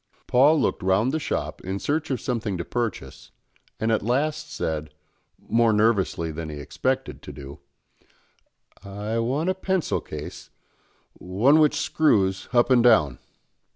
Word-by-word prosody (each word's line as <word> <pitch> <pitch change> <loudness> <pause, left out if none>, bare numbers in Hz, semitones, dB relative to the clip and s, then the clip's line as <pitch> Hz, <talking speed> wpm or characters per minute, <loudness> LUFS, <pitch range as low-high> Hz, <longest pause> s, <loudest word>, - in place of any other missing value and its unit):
Paul 145 +5 +4
looked - - 0
round 95 +7 +2
the 160 - -1
shop - - -3
in 95 +2 -3
search 150 +8 -2
of 130 - -1
something 115 -7 -2
to 85 - -4
purchase, 115 - -4 0.5
and 110 +1 0
at 110 - +2
last 150 +6 -1
said, 75 -1 -4 0.4
more 115 0 +2
nervously 105 -6 +1
than 80 0 -6
he 75 - -7
expected 70 - -3
to - - -9
do, 70 +1 -10 1.2
"I 105 +3 -4
want 140 +10 0
a - - 0
pencil 190 -2 -1
case, 75 +4 -8 0.6
one 110 +12 +2
which 150 -2 +4
screws 95 -11 +1
up 120 +1 +3
and 120 -2 +5
down." 80 - +4
110 Hz, 145 wpm, -24 LUFS, 90-135 Hz, 1.2 s, and